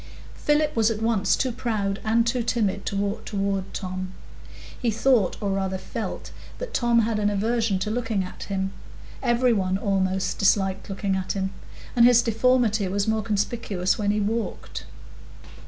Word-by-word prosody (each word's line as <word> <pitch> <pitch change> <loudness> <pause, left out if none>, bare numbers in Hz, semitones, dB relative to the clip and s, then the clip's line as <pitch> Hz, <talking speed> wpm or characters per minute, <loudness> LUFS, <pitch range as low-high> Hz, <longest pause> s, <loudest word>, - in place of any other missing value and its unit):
Philip 295 0 +1
was 225 -1 +4
at 220 -2 -2
once 220 -4 +2
too 260 - 0
proud 215 -4 -2
and 230 +1 +3
too 240 +1 +1
timid 215 -4 0
to - - -2
walk 200 +1 -1
toward 195 -2 -2
Tom. 185 0 -5 0.7
He 240 - +1
thought, 225 -2 +2
or 200 -2 -1
rather 190 -1 -1
felt, - - -5 0.3
that - - -6
Tom 240 - +3
had 220 -1 0
an 205 0 +2
aversion 220 0 +1
to 190 +3 -2
looking 225 -4 -1
at 180 - -8
him; 195 -1 -2 0.5
every 245 -1 +3
one, 190 -3 +1
almost, 190 -2 0
disliked 195 -1 +2
looking 195 0 -1
at 190 -1 -2
him; 190 -1 -2 0.4
and 235 - +6
his 240 0 +7
deformity 225 -2 +2
was 200 +3 -1
more 220 0 +1
conspicuous 205 -3 -1
when 205 -1 0
he 210 +1 +2
walked. 220 +2 -3
210 Hz, 165 wpm, -25 LUFS, 195-230 Hz, 0.7 s, his